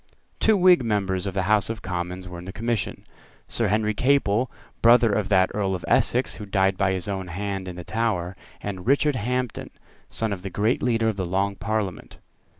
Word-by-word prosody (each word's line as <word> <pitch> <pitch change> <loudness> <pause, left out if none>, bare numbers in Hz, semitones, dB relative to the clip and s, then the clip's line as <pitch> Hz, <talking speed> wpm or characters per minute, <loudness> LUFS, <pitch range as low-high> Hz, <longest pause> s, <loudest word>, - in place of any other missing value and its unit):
Two 220 -2 +4
Whig 180 -5 +6
members 100 -4 -1
of 95 - -4
the 95 - +1
House 105 +2 +2
of 115 -2 -5
Commons 90 0 -4
were 90 -1 -8
in 90 - -10
the 95 - -6
Commission, 115 -1 -3 0.4
Sir 115 - 0
Henry 105 +1 +1
Capel, 125 -1 +2 0.3
brother 115 -2 +6
of 100 -1 0
that 95 -2 +4
Earl 95 -2 0
of 90 - -6
Essex 125 +2 +2
who 105 - -7
died 95 -1 +2
by 95 0 +1
his 95 -1 -3
own 95 -2 -3
hand 95 +1 -4
in 90 - -6
the 90 - -7
Tower, 100 -4 -1 0.3
and 95 -2 -6
Richard 145 +1 +3
Hampden, 125 +1 -2 0.4
son 110 -2 -2
of 95 - -6
the 95 - -5
great 105 +6 0
leader 115 -3 +1
of 105 - -3
the 95 - -1
Long 100 +2 0
Parliament. 105 -4 -3
100 Hz, 200 wpm, -24 LUFS, 95-115 Hz, 0.4 s, Whig